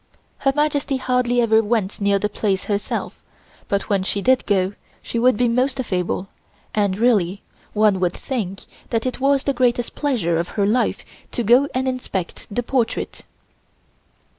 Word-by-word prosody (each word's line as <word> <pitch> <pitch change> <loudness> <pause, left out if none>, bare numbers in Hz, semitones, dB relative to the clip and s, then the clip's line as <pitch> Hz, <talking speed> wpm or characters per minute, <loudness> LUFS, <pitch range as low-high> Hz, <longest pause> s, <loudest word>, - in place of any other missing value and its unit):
Her 275 - +2
Majesty 290 -2 +1
hardly 250 -1 +1
ever 220 -1 +4
went 210 -3 -1
near 200 0 +3
the 210 - 0
place 200 -2 -1
herself, 205 -1 -3 0.5
but 200 0 -1
when 200 -2 +1
she 190 +2 -1
did 255 +5 +2
go, 195 -1 +2 0.3
she 235 - -2
would 250 -1 +4
be 245 - +3
most 255 +3 +1
affable 185 -5 -1 0.5
and, 200 -3 +1
really, 205 -5 +2 0.3
one 210 -3 +3
would 180 -1 +1
think 205 -8 -4 0.3
that 230 0 -1
it 255 - -2
was 275 0 +3
the 275 - +1
greatest 245 -2 +1
pleasure 230 - 0
of 170 - -1
her 200 - +3
life 230 +5 +1 0.3
to 240 - -1
go 245 +6 +5
and 260 +1 0
inspect 250 -8 -4
the 245 +4 -2
portrait. 240 -1 -1
230 Hz, 165 wpm, -21 LUFS, 200-255 Hz, 0.5 s, go